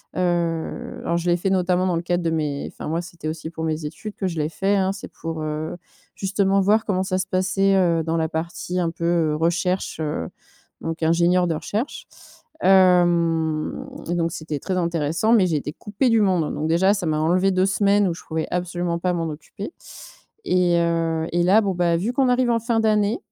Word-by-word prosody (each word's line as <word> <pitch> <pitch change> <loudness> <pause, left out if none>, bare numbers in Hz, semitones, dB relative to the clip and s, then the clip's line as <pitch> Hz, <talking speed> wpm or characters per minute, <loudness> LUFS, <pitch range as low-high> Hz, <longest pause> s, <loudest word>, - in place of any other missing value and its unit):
heu, 170 -2 -2
alors, 170 - 0
je 170 +1 -1
l'ai 175 - +3
fait, 185 +2 -1
notamment, 185 -1 +1
dans 180 - +1
le 165 - -1
cadre 175 0 -1
de 165 - +1
mes 150 -3 -2
enfin, - - -8
moi, 165 +2 -1
c'était 170 -3 -8
aussi 160 0 -5
pour 160 -1 -6
mes 155 -1 -2
études 205 +8 -7
que 190 - -2
je 170 -2 -4
l'ai 150 0 0
fait, 195 +5 0
hein. 190 -1 +2
C'est - - -8
pour, 165 -1 -5
heu, 155 +1 -3 0.4
justement 195 0 +1
voir 215 +3 +3
comment 190 -3 0
ça 185 0 -1
se 185 - -1
passait, 185 +1 +1
heu, 170 -3 +2
dans 165 +1 -1
la 160 -1 0
partie 170 +3 -3
un 170 -2 0
peu, 170 - -8
heu, 165 -3 +2
recherche, 175 +3 -1
heu, 150 - -3 0.5
donc 165 +1 -4
ingénieur 175 +2 +3
de 165 - 0
recherche, 215 - -4 0.6
hem, 175 - +3 0.2
donc 170 -1 0
c'était 155 -3 -5
très 185 +6 -2
intéressant. 170 +4 +1
Mais 200 -6 +5
j'étais 150 -3 -2
coupée 210 - -1
du 225 -1 +4
monde. 180 -6 +1
Donc 155 - -2
déjà, 180 +5 +3
ça 200 -4 -3
m'a 155 -1 0
enlevé 180 +5 +2
2 185 0 +2
semaines 200 +1 +3
où 175 - 0
je 165 - -11
pouvais 160 -1 -3
absolument 175 -1 -2
pas 180 +1 0
m'en 170 -1 -1
occuper 160 - -7 0.7
et 180 -1 +3
heu 165 -1 0
et 175 - +1
là, 195 +5 +5
bon, 200 -3 -1
bah, 170 -1 +2
vu 210 +8 -2
qu'on 260 0 +2
arrive 250 -1 +2
en 230 - +2
fin 230 0 0
d'année, 215 0 +2
175 Hz, 210 wpm, -22 LUFS, 165-190 Hz, 0.7 s, Mais